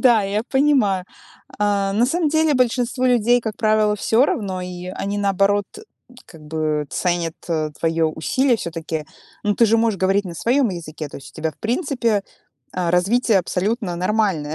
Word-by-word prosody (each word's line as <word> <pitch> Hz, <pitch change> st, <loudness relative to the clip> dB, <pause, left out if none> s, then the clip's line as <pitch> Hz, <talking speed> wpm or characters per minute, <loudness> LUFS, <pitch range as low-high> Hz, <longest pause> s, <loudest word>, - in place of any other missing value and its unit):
да, 240 Hz, -5 st, +5 dB
я 200 Hz, +2 st, -1 dB
понимаю. 265 Hz, -9 st, +2 dB, 0.5 s
А, 200 Hz, -1 st, +1 dB
на 220 Hz, +4 st, +3 dB
самом 325 Hz, +2 st, +1 dB
деле 315 Hz, 0 st, +2 dB
большинству 250 Hz, 0 st, +1 dB
людей, 245 Hz, -1 st, +3 dB
как 220 Hz, -2 st, -5 dB
правило, 215 Hz, -2 st, +2 dB
всё 225 Hz, +4 st, +3 dB
равно, 190 Hz, -8 st, -2 dB
и 180 Hz, 0 st, -7 dB
они, 200 Hz, +2 st, -3 dB
наоборот, 200 Hz, 0 st, +2 dB, 0.6 s
как 160 Hz, -2 st, -15 dB
бы 155 Hz, -1 st, -2 dB
ценят 175 Hz, -2 st, -1 dB, 0.5 s
твоё 165 Hz, -1 st, +1 dB
усилие 245 Hz, -, +1 dB
всё-таки. 165 Hz, -4 st, -4 dB, 0.4 s
Ну, 205 Hz, -1 st, +1 dB
ты 230 Hz, -, +4 dB
же 225 Hz, +1 st, +3 dB
можешь 225 Hz, -4 st, +1 dB
говорить 195 Hz, +2 st, +2 dB
на 170 Hz, -, -7 dB
своём 250 Hz, -, +2 dB
языке, 160 Hz, -4 st, -6 dB
то -, -, -9 dB
есть 135 Hz, -, -11 dB
у -, -, -19 dB
тебя, 160 Hz, 0 st, -1 dB
в -, -, -30 dB
принципе, 235 Hz, -, 0 dB, 0.5 s
а, 180 Hz, -2 st, -1 dB
развитие 200 Hz, +5 st, +3 dB
абсолютно 190 Hz, +1 st, -2 dB
нормальное, 185 Hz, -5 st, 0 dB
205 Hz, 165 wpm, -21 LUFS, 175-235 Hz, 0.6 s, да